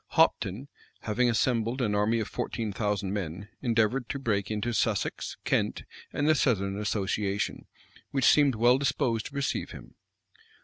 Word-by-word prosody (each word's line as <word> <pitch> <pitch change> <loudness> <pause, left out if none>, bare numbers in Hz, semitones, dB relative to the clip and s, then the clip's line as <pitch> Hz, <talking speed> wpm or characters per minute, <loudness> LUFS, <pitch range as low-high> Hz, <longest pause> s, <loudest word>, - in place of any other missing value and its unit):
Hopton, 105 +9 +2 0.3
having 120 +3 +1
assembled 115 +1 +1
an 110 -5 +1
army 105 +3 +2
of 110 - -2
fourteen 110 -3 -3
thousand 105 -2 -1
men, 100 0 -4
endeavored 115 0 +1
to - - -2
break 105 -7 -1
into 110 +3 -2
Sussex, 105 -1 -1
Kent, - - 0 0.3
and 145 - 0
the 155 - +6
southern 100 -9 +1
association, 100 -1 -1 0.4
which 135 -3 0
seemed 145 -4 +5
well 120 +4 +4
disposed 135 -5 0
to 140 - -13
receive 140 -1 -1
him. - - -11
115 Hz, 145 wpm, -28 LUFS, 105-125 Hz, 0.4 s, the